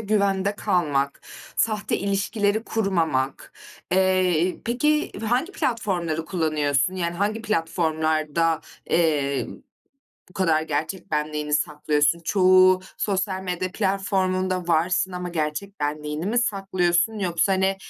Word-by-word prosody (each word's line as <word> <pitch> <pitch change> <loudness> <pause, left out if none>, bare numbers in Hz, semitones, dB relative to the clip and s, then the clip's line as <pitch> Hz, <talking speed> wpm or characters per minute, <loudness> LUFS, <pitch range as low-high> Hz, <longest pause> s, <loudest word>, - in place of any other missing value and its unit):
güvende 200 -2 +1
kalmak, 140 -8 0 0.4
sahte 215 -2 0
ilişkileri 205 +2 0
kurmamak. 165 - -1 0.4
Eee, 185 -2 +2
peki, 300 +6 +1 0.2
hangi 260 +11 0
platformları 195 - -1
kullanıyorsun? 155 -2 0
Yani, 170 -2 -2
hangi 210 +4 -1
platformlarda, 160 -4 0 0.3
eee, 145 -5 +1 0.8
bu - - -18
kadar 165 -4 +2
gerçek 160 +4 -3
benliğini 150 0 -1
saklıyorsun? 150 +1 +1
Çoğu 185 0 +5 0.2
sosyal 190 -1 -1
medya 180 0 -3
platformunda 190 -2 0
varsın 175 +3 +1
ama 180 0 -4
gerçek 170 +4 -3
benliğini 150 +2 -3
mi 230 +4 +1
saklıyorsun 195 -2 +1
yoksa, 180 -1 +1
hani, 190 0 +1
185 Hz, 105 wpm, -24 LUFS, 155-195 Hz, 0.8 s, Çoğu